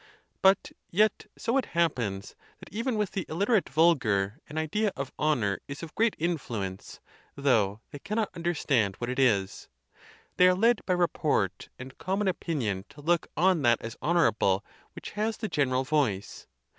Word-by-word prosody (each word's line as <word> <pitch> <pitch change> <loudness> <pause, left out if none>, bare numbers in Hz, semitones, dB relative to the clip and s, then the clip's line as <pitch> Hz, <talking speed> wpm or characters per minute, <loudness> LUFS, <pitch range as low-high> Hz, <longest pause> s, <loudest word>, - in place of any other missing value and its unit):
But 190 0 +4 0.2
yet, 210 +4 +2
so 235 +4 0
it 260 - -2
happens, 115 - 0 0.2
that - - -14
even 230 +3 -1
with 210 -3 -1
the 190 - -2
illiterate 200 +5 +1
vulgar 115 -12 +2
an 150 - -7
idea 200 +7 0
of 135 -1 -5
honor 120 -11 +1
is 140 +3 -7
of 160 - -8
great 225 0 +2
influence, 115 - -4 0.4
though 110 -7 +1
they 145 - -8
cannot 215 +3 -2
un 170 - -8
derstand 135 - +1
what 120 +1 -4
it 130 - -3
is. 100 -7 +1 0.7
They 180 - +7
are 185 - +4
led 230 +3 +3
by 185 - +3
report 155 - 0
and 130 0 -10
common 195 +2 -1
opinion 120 - -2
to 145 +1 -14
look 170 +3 +1
on 180 0 +3
that 120 -3 +4
as 115 +1 -6
honorable 110 - +2 0.3
which - - -8
has 215 +1 -2
the 220 - -3
general 135 -7 +1
voice. 130 -9 -1
155 Hz, 165 wpm, -28 LUFS, 115-185 Hz, 0.7 s, They